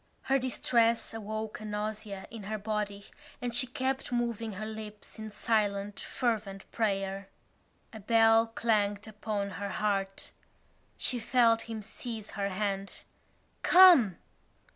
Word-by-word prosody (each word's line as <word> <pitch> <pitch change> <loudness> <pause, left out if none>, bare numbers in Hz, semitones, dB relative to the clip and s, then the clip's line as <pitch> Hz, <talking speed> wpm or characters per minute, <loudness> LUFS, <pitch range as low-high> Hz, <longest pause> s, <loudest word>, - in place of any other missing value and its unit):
Her 270 0 +2
distress 235 -3 +1
awoke 220 0 -5
a 215 - -8
nausea 210 -1 -4
in 225 -1 -7
her 215 +1 -3
body 210 -1 -3 0.3
and 245 -1 -3
she 255 +2 +4
kept 260 +1 -2
moving 235 -2 -1
her 210 +3 -5
lips 215 -1 -8
in 215 0 -6
silent 205 -2 0
fervent 215 -6 -2
prayer. 195 -3 -1 0.6
A 220 - -8
bell 225 +1 +5
clanged 210 -2 0
upon 210 -1 -3
her 200 +1 -4
heart. 195 -2 -2 0.7
She 250 - -1
felt 230 -1 +3
him 220 -2 -5
seize 220 0 -6
her 200 -1 -2
hand: 195 0 -3 0.6
"Come!" 345 - +7
215 Hz, 125 wpm, -30 LUFS, 200-230 Hz, 0.7 s, Come